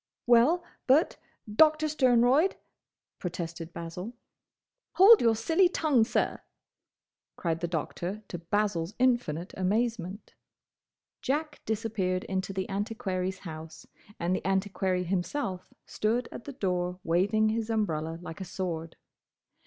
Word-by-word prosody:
"Well, 245 +9 +5 0.2
but, 280 +6 +4 0.3
Doctor 310 +8 +4
Sternroyd—" 260 +3 +3 0.6
protested 170 -1 -5
Basil. 170 +7 -6 0.8
"Hold 415 +4 +8
your 230 -1 +4
silly 325 - +3
tongue, 290 -10 +2
sir!" - - -1 0.9
cried 165 -2 -2
the 170 - -2
Doctor 175 +5 -4
to 175 - -6
Basil's 185 0 -1
infinite 240 -10 +1
amazement. 205 0 -1 0.9
Jack 295 +2 -2
disappeared 210 -5 -1
into 190 0 -3
the 190 -1 -3
Antiquary's 195 -2 -2
house 160 -1 -8 0.3
and 175 +2 0
the - - -4
Antiquary 190 -1 0
himself 185 +2 -3
stood 230 +3 -1
at - - -9
the 285 - -6
door 180 -6 -2
waving 205 +6 +2
his 225 0 -2
umbrella 165 -8 -1
like 165 +2 -8
a - - -2
sword. 165 -3 -4
200 Hz, 115 wpm, -29 LUFS, 180-240 Hz, 0.9 s, Hold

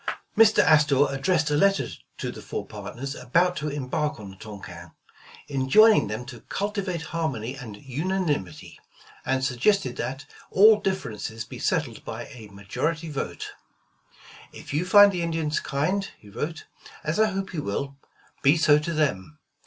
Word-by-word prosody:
Mr. 220 -1 +6
Astor 150 -2 +5
addressed 160 +2 +1
a - - +2
letter 195 +6 +3 0.3
to - - -3
the - - -10
four - - -5
partners 110 +7 -7
about 170 +8 +1
to 150 - -3
embark 145 0 -2
on 100 -2 -9
the - - -13
Tonquin, 95 -5 -10 0.5
enjoining 145 - +5
them 110 +4 -5
to 120 -3 -9
cultivate 200 -4 -3
harmony 135 -8 -2
and 115 -6 -9
unanimity, 145 - -3 0.5
and 130 0 +1
suggested 175 - +1
that 135 +2 -4 0.2
all 210 +2 +7
differences 115 - -3
be - - -10
settled - - -1
by - - -6
a 115 -4 -11
majority 150 +12 -3
vote. 140 - -5 1.0
"If - - -10
you 155 +5 0
find 205 +2 +8
the 180 -2 -3
Indians 160 -2 -1
kind," 180 +9 -1
he 105 - -16
wrote, 160 +9 -5 0.4
"as 155 +6 -1
I 220 - +5
hope 195 -2 -4
you 160 - -2
will, 140 +5 -3 0.5
be 140 +4 +5
so 150 -1 +5
to 170 +3 -3
them. 150 -4 -1
150 Hz, 155 wpm, -25 LUFS, 125-180 Hz, 1.0 s, find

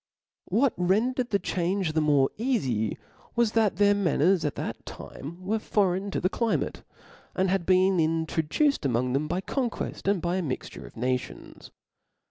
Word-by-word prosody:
What 260 +2 +2
rendered 235 +8 +1
the 200 - +2
change 180 -2 -1
the 160 - +2
more 145 -3 +3
eafy 135 - 0 0.4
was, 235 -2 +3
that 220 -5 +2
their 205 +2 +4
manners 180 -2 +2
at 150 - -1
that - - -5
time 170 +6 -9
were 220 +3 0
foreign 195 -2 0
to - - -2
the 185 - +1
climate; 230 +3 -1 0.5
and 185 0 +1
had 190 -3 0
been 185 0 +4
introduced 160 - +1
amongft 125 -1 0
them 145 +3 0
by 180 +4 -1
conqucft, 240 -3 -3
and 200 -1 +3
by 175 +2 -1
a - - 0
mixture 140 -7 -5
of - - -16
pations. 125 +2 -4
185 Hz, 160 wpm, -27 LUFS, 155-205 Hz, 0.5 s, their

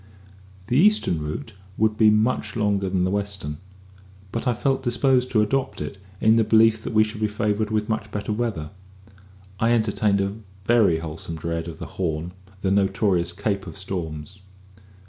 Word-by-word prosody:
The 125 +6 +2
eastern 200 - +3
route 75 +9 -5 0.2
would 110 0 +2
be 110 0 +5
much 110 +5 +1
longer 100 -3 +1
than 90 -1 +1
the 95 - +1
western; 100 -7 -3 0.7
but 115 +3 -3
I 120 - +2
felt 135 +3 0
disposed 125 0 +2
to 110 -2 +3
adopt 135 +5 -1
it, 75 +6 -6 0.2
in 110 +1 +5
the 115 - +4
belief 110 0 +4
that 115 - -5
we 110 0 +6
should 110 0 -6
be 110 - +3
favoured 105 0 -1
with 105 -1 0
much 110 -1 -2
better 105 +1 -3
weather. 105 -9 -2 0.9
I 115 +1 +3
entertained 105 -3 +2
a 100 0 0 0.3
very 110 -8 +4
wholesome 80 +1 -6
dread 85 +1 -3
of 80 -2 -7
the - - -6 0.2
"Horn" 80 0 -2 0.3
the 95 - 0
notorious 95 -3 +2
"Cape 100 +1 -2
of - - -8
Storms." 90 -2 -5
105 Hz, 170 wpm, -24 LUFS, 90-110 Hz, 0.9 s, we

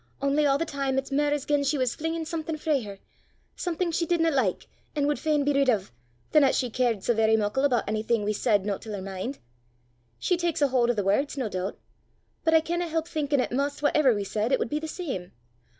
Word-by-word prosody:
Only 280 +2 +2
a' 275 -1 +4
the 330 - -1
time 275 -3 -2
it's 270 +1 -2
mair 290 +1 +2
as 290 -2 -1
gien 290 -1 +2
she 280 +2 +1
was 255 -3 0
flingin' 325 +1 -3
something 320 -1 -3
frae 300 -3 +1
her, 200 -3 -8 0.6
something 350 0 -2
she 335 +1 -1
didna 330 -2 +2
like 250 - 0 0.3
an' 290 -1 +1
wud 295 0 0
fain 305 -2 +1
be 290 +1 +2
rid 275 -1 +3
o', 215 -6 +2 0.5
than 305 - +6
'at 270 - +3
she 250 -3 0
cared 235 -4 0
sae 240 - +2
verra 220 0 +3
muckle 215 +5 0
aboot 245 -5 +2
onything 215 +1 0
we 210 +1 0
said 205 -2 +1
no 200 -2 -1
til 220 - -8
her 200 - -4
min'. 195 +7 -4 0.8
She 360 - +1
taks 340 -4 0
a 285 - +4
haud 250 -2 +2
o' - - +4
the 205 -3 -1
words, 270 +10 +1
no 255 -4 -1
doobt! 185 +1 -3 0.7
but 325 0 +3
I 320 - +6
canna 345 +2 -2
help 325 0 -2
thinkin' 290 -4 0
'at - - -3
'maist 280 +3 -1
whatever 290 -4 +4
we 205 - -2
said, 215 +4 -1
it - - +4
wud - - -2
be 300 - -1
the 315 - -5
same. 265 - -5
275 Hz, 240 wpm, -27 LUFS, 220-305 Hz, 0.8 s, than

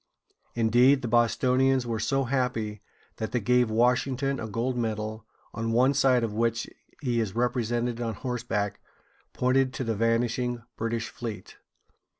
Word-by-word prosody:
Indeed, 120 +4 +4
the - - -1
Bostonians 125 +3 +2
were 115 -2 -2
so 135 +5 +1
happy 120 -5 -1 0.4
that 110 - -4
they 125 - +2
gave 125 +2 +2
Washington 125 +4 +1
a 115 - -4
gold 120 +4 -2
medal, 110 -1 -3 0.3
on 115 0 -2
one 130 +4 +4
side 130 -3 +3
of 110 -2 -2
which 115 +1 0 0.4
he 120 -3 +1
is 110 -3 -2
represented 120 0 0
on 115 -2 -2
horseback, 110 -4 -3 0.5
pointing 130 +1 +2
to 130 - -5
the 115 -2 -1
vanishing 115 +2 0
British 115 0 -2
fleet. 115 -4 -7
120 Hz, 145 wpm, -27 LUFS, 115-125 Hz, 0.5 s, Indeed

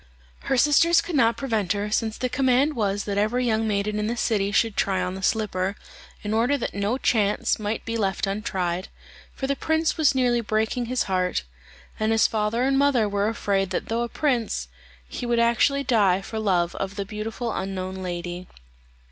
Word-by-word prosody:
Her 265 - +2
sisters 315 +5 +5
could 335 0 -3
not 230 -4 +3
prevent 220 -8 0
her, 205 +1 -3
since 220 0 0
the 255 - -1
command 265 +3 +2
was 205 -2 0
that 200 -1 -1
every 240 +4 +1
young 220 -1 +1
maiden 210 0 -1
in 210 - -1
the 235 +2 -2
city 205 -4 0
should 220 0 +2
try 190 -1 +1
on 180 0 -2
the 190 - -7
slipper, 195 -2 0 0.5
in 210 0 -2
order 240 +6 +2
that 245 - -4
no 200 +5 -1
chance 210 -6 +1
might 215 +1 -3
be 230 - -3
left 195 -1 0
untried, 190 -3 -2 0.5
for 270 - -3
the 280 +1 0
prince 320 +2 0
was 300 -4 +3
nearly 245 -2 +2
breaking 220 +2 -1
his 255 0 0
heart; 185 - -1 0.6
and 215 +1 +1
his 225 -1 +4
father 220 +2 0
and 270 +1 +2
mother 270 -6 +3
were 205 0 0
afraid 200 -3 0
that 185 - -3
though 230 +1 0
a 240 - -2
prince, 235 - -1 0.4
he 240 - -5
would 240 0 +1
actually 235 +4 +3
die 205 -8 +3
for 220 +3 -6
love 180 -5 +1
of 195 0 -4
the 200 -1 -3
beautiful 220 +3 -4
unknown 190 -1 -4
lady. 175 -1 -5
215 Hz, 190 wpm, -24 LUFS, 195-245 Hz, 0.6 s, sisters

